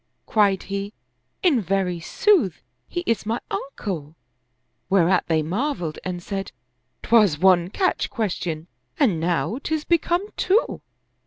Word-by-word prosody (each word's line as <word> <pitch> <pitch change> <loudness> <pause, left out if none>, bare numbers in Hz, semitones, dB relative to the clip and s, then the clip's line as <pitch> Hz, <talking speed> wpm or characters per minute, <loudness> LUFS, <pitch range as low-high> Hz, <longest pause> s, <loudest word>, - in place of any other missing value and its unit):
Cried 200 -3 +2
he, 200 +1 -4 0.2
" - - -49
In 300 -11 +4
very 185 -2 0
sooth, 280 - +2 0.2
he 350 - -3
is 230 -3 0
my 225 +2 -1
uncle 170 - -5 0.4
"; 125 +6 -49
whereat 185 -2 +3
they 160 -2 +2
marveled 180 - -2
and 180 -1 -4
said, 195 0 -4 0.3
" 125 +1 -49
'Twas 210 -9 +4
one 180 0 +4
catch 370 - 0
question 175 -7 -3 0.3
and 215 - +3
now 175 +8 0
'tis 315 -1 -1
become 345 +2 +1
two." 420 +6 +1
195 Hz, 140 wpm, -23 LUFS, 170-240 Hz, 0.4 s, In